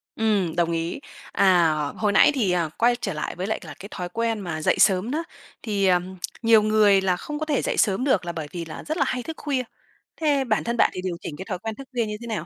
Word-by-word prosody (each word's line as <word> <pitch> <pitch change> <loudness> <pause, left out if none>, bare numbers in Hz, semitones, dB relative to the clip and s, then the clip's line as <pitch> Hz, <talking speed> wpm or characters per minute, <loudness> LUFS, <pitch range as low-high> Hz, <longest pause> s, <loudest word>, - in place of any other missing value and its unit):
Ừm, 205 -7 +1
đồng 170 -1 +1
ý. 165 +7 -2 0.3
À, 175 -5 +4 0.2
hồi 210 -2 +1
nãy 200 - +6
thì, 215 -9 +1
à, 170 -3 0
quay 240 +1 +3
trở 200 -6 -4
lại 150 - -4
với 185 +3 -4
lại 220 - -1
là 155 - -8
cái 200 - -9
thói 180 -1 -5
quen 230 +2 -1
mà 165 -5 -4
dậy - - +2
sớm 195 +5 +3
đó, 320 +3 -1 0.4
thì, 205 -4 0
ờm, 185 +1 +1 0.2
nhiều 225 -2 +6
người 210 -2 +4
là 185 -2 +1
không 300 0 -6
có 310 - -2
thể 295 -4 0
dậy - - -2
sớm 205 +3 +2
được 210 -10 +2
là 170 - -2
bởi 160 -3 -5
vì 170 -2 -5
là 155 - -8
rất 310 +3 -3
là - - +3
hay 250 -1 -2
thức 320 - -7
khuya. 270 -4 -1 0.5
Thế 290 -4 +1
bản 220 -4 0
thân 235 0 -2
bạn - - +5
thì 185 - -5
điều 185 -2 -3
chỉnh 145 - -6
cái 190 - -7
thói 180 - -3
quen 220 0 -5
thức 275 -1 -10
khuya 235 -3 0
như 210 0 -4
thế 235 - -7
nào? 210 -8 -3
205 Hz, 270 wpm, -24 LUFS, 180-235 Hz, 0.5 s, nãy